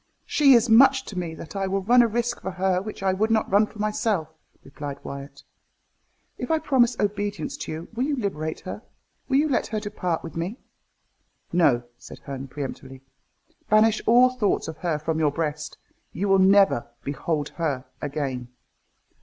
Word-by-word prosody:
"She 285 -4 +5
is 235 -1 +4
so 225 - +3
much 265 +2 +6
to 205 - -8
me 165 -2 -4
that 160 - -10
I 195 -1 -1
will 195 0 -1
run 245 +5 +6
a 235 - +4
risk 240 +2 -2
for - - -4
her 185 0 0
which 205 -1 -7
I 190 -1 +2
would 215 +4 0
not 220 -1 +2
run 205 +2 +4
for 215 - -15
myself," 210 -5 -1 0.3
replied 140 0 -7
Wyat. 140 +1 -8 1.0
"If - - -4
I 320 - +3
promise 260 -6 +2
obedience 205 +6 -2
to - - -6
you, 160 +2 -6
will 240 +2 -1
you 290 0 0
liberate 160 - -3
her? 185 - -7 0.5
will 270 - +3
you 300 +2 +3
let 275 - 0
her 215 - -2
depart 180 -5 -3
with 165 - -8
me?" 175 +8 -3 1.0
"No," 140 -9 +3 0.2
said - - -11
Herne 135 -1 -7
peremptorily. 135 -1 -7 0.7
"Banish 215 +1 +4
all 245 +2 +6
thoughts 240 -6 0
of 160 -1 -6
her 170 -4 -1
from 155 +1 -2
your 150 -2 +2
breast. 150 -1 -4 0.4
You 195 +5 -2
will 195 0 +5
never 195 -9 +4 0.2
behold 145 +1 -2
her 140 -6 -1 0.2
again. 135 -4 -3
195 Hz, 180 wpm, -24 LUFS, 155-225 Hz, 1.0 s, much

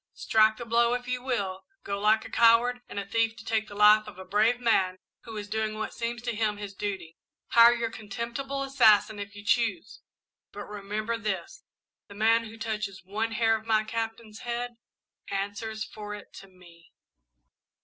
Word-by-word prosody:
Strike 220 0 +3
the 240 - -6
blow 235 +1 +3
if 245 0 -6
you 250 0 -2
will 200 -7 -2 0.2
go 200 0 -3
like 215 +2 +3
a - - -10
coward 235 +2 +4
and - - -8
a 200 - -2
thief 225 +2 0
to 235 - -13
take 220 -1 0
the 205 - -10
life 210 +1 +6
of 210 - -10
a 190 - -9
brave 215 +6 +2
man, 190 -6 +2 0.3
who 225 -2 -7
is 205 -1 -5
doing 215 0 -2
what 215 - -4
seems 235 0 -4
to 235 -2 -2
him 210 -1 0
his 205 -1 -7
duty 190 -5 -5 0.3
hire 235 +1 +7
your 230 -1 -2
contemptible 235 +6 -4
assassin 220 -6 +4
if 200 0 -7
you 205 0 -11
choose, 215 -4 0 0.5
but 205 - -7
remember 210 +3 -4
this 215 - -4 0.5
the 200 - -12
man 225 +2 +3
who 225 0 -10
touches 215 -4 -4
one 220 +4 -2
hair 225 0 +3
of 220 0 -7
my 215 -1 +3
Captain's 225 0 -5
head, 240 0 -4 0.5
answers 205 +2 -3
for 210 -1 -7
it 205 - -13
to 195 - -11
me!" 175 -3 -19
220 Hz, 185 wpm, -28 LUFS, 205-230 Hz, 0.5 s, hire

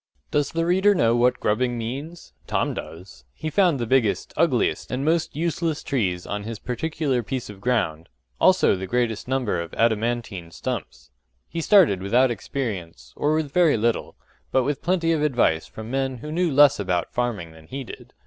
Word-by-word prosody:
Does 145 -1 +1
the 165 0 0
reader 190 +4 +4
know 115 -7 +3
what 125 +1 +2
grubbing 120 +3 0
means? 140 +9 -6
Tom - - 0
does. 80 -4 -9
He 155 - -4
found 180 -6 +3
the 120 - -1
biggest, 115 -3 +1
ugliest, 155 -7 +1
and 130 +2 -2
most 160 -1 +1
useless 165 0 -1
trees 95 - -1
on 105 0 -3
his 110 +2 -6
particular 135 +2 -2
piece 125 -1 -4
of 100 -1 -14
ground; 85 -10 -1 0.3
also - - +4
the 95 0 -5
greatest 120 -1 -1
number 125 -9 0
of 85 -1 -7
adamantine 115 -5 0
stumps. 80 - -6 0.4
He 165 - -4
started 165 - +5
without 120 +6 +3
experience, 95 - -5
or 150 +1 +1
with 155 -3 -2
very 170 -8 +4
little, 115 +1 -1 0.4
but 130 - +3
with 140 +2 -2
plenty 170 -1 +1
of 160 -2 +1
advice 120 - +2
from 110 +1 -9
men 135 -1 -1
who 150 +6 -7
knew 170 +1 +1
less 145 -1 +6
about 90 -4 -1
farming 115 -9 -2
than 80 0 -16
he 135 +7 -5
did. - - -11
125 Hz, 175 wpm, -24 LUFS, 105-150 Hz, 0.4 s, less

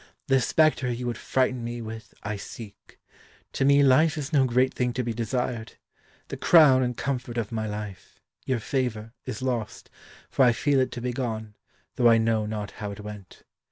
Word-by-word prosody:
"The 135 -1 +3
spectre 145 -1 +2
you 120 +1 -4
would 120 -2 -2
frighten 130 -2 0
me 120 +1 -4
with, 110 0 -8
I 105 +1 -3
seek. 105 +1 -11 0.5
To - - 0
me 140 +1 +5
life 145 +4 +4
is 150 +1 -5
no 135 -3 +5
great 130 +1 +2
thing 125 -1 -1
to 125 - -1
be 120 -1 -2
desired. 115 0 -3 0.6
The - - -5
crown 150 -6 +6
and 125 -1 -1
comfort 125 -2 -3
of 115 -2 -2
my 110 -1 -2
life 105 -2 -7 0.2
your 130 -3 -1
favour 115 -3 -2
is 110 - -5
lost, 120 -5 -3 0.4
for 135 - +2
I 120 -2 +5
feel 140 +3 +1
it 130 - +1
to 120 - -6
be 125 0 -2
gone, 110 -4 -4 0.4
though 120 -1 +5
I 115 - +6
know 110 -1 +1
not 105 -2 -4
how 105 - -3
it 100 - -8
went. 105 -2 -10
120 Hz, 195 wpm, -26 LUFS, 110-130 Hz, 0.6 s, crown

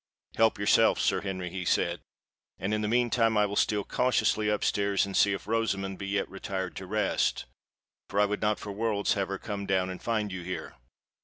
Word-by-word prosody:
"Help 110 0 +3
yourself, 100 0 +4
Sir - - +1
Henry," 95 -3 -4
he 95 0 -4
said: 85 0 +1 0.6
"and 95 +4 -2
in 105 - 0
the 105 - -1
meantime 115 -1 +2
I 105 - +4
will 100 0 -4
steal 105 0 +2
cautiously 110 -3 +1
up 105 -1 0
stairs 100 -1 +1
and 100 -1 -6
see 100 - +4
if 95 - -5
Rosamond 100 -4 -1
be 100 - -5
yet 100 0 0
retired 95 -1 -5
to 95 - -7
rest—for 105 0 -3
I 105 - +5
would 105 0 -3
not 105 0 +1
for 105 - -7
worlds 105 0 0
have 100 -2 -1
her 100 - -3
come 100 0 -5
down 95 -1 +1
and 90 - -8
find 110 -3 -1
you 95 -1 -5
here." 90 +1 -5
100 Hz, 205 wpm, -28 LUFS, 95-105 Hz, 0.6 s, I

